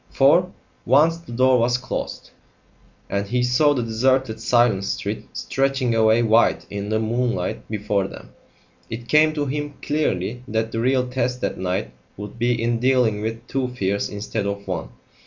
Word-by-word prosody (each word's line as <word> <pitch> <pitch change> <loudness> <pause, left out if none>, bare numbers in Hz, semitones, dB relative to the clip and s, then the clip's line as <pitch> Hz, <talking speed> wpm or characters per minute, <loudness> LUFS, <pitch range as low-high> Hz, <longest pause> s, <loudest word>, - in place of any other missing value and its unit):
For, - - +4 0.3
once 155 +7 +4
the 170 -7 -13
door 130 +1 +3
was 120 +1 +2
closed, 130 - -5 0.8
and 100 0 -2
he 125 +3 0
saw 145 +4 +3
the 125 - -1
deserted 115 +1 +1
silent 120 -4 +2
street 100 - -4
stretching 135 -3 0
away 110 +1 +4
white 115 +1 +3
in 100 0 -4
the 110 - +1
moonlight 115 -3 -1
before 105 -2 -1
them, - - -11 0.6
it 120 +1 -6
came 155 +1 +5
to 145 -2 -1
him 145 +1 -4
clearly 125 -7 -1
that 110 +1 -1
the 115 - -2
real 125 +1 +2
test 125 0 -1
that - - -2
night 95 0 -2 0.3
would 105 +3 -8
be 120 0 +1
in 115 0 0
dealing 125 -4 +2
with 115 +2 -4
two 135 -1 -1
fears 100 -5 -2
instead 105 0 -3
of 100 0 -5
one. 90 -3 -3
120 Hz, 165 wpm, -22 LUFS, 110-130 Hz, 0.8 s, came